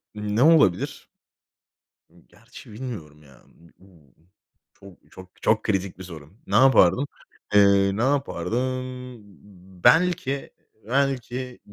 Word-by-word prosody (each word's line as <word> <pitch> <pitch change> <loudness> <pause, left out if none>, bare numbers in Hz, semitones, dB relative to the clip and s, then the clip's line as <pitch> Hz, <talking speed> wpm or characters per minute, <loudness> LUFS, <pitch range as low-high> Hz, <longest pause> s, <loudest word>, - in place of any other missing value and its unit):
Ne 105 +4 -1
olabilir? 155 - +2 1.2
Gerçi 115 +1 -16
bilmiyorum 85 - -9
ya 70 -3 -20
b 85 0 -23
b 85 -9 -23 0.6
çok, 100 -3 -18
çok, 95 -1 -15
çok 110 0 +1
kritik 95 -3 -2
bir - - -8
soru. 80 -2 -12
Ne - - -2
yapardım? 130 0 +4 0.5
Iıı, 100 0 +4
ne - - -1
yapardım? 130 -2 -1 1.0
Belki, 160 -5 +2 0.4
belki 130 -1 -2
110 Hz, 100 wpm, -23 LUFS, 95-130 Hz, 1.2 s, yapardım